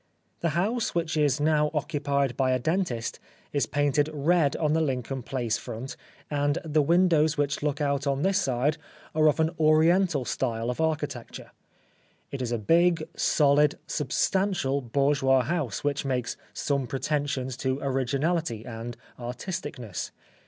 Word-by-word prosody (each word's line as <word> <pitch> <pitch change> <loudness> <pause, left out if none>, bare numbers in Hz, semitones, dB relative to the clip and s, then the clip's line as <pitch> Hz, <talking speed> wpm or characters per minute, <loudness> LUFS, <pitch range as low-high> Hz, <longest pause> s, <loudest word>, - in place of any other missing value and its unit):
The 170 -1 -1
house, 225 +5 0
which 165 -2 0
is 145 -2 +2
now 150 0 +3
occupied 140 -4 0
by 130 0 +2
a - - +3
dentist, 145 -4 -1 0.3
is 145 - +1
painted 145 +1 +1
red 155 0 +2
on 155 -2 +1
the 160 - +2
Lincoln 130 -2 -2
Place 120 -3 -2
front, 125 +5 -6 0.3
and 145 +1 0
the 155 -1 +2
windows 165 -1 +3
which 145 0 0
look 145 0 -1
out 140 -1 0
on 140 +1 0
this 195 +1 +2
side 135 +3 0 0.3
are 155 0 +4
of 150 - +2
an 160 0 +2
Oriental 160 -1 +4
style 115 -2 -1
of 125 - -4
architecture. 150 -6 -3 0.8
It 140 - -4
is 120 -2 -2
a 120 - +1
big, 165 - +3
solid, 145 0 +3
substantial 150 0 0
bourgeois 135 +1 +2
house 140 - -2
which 145 0 0
makes 125 -3 -2 0.2
some 140 -3 -1
pretensions 135 -2 -2
to 130 0 -1
originality 135 0 -1
and 115 0 -6 0.2
artisticness. 125 - -5
145 Hz, 145 wpm, -27 LUFS, 130-155 Hz, 0.8 s, are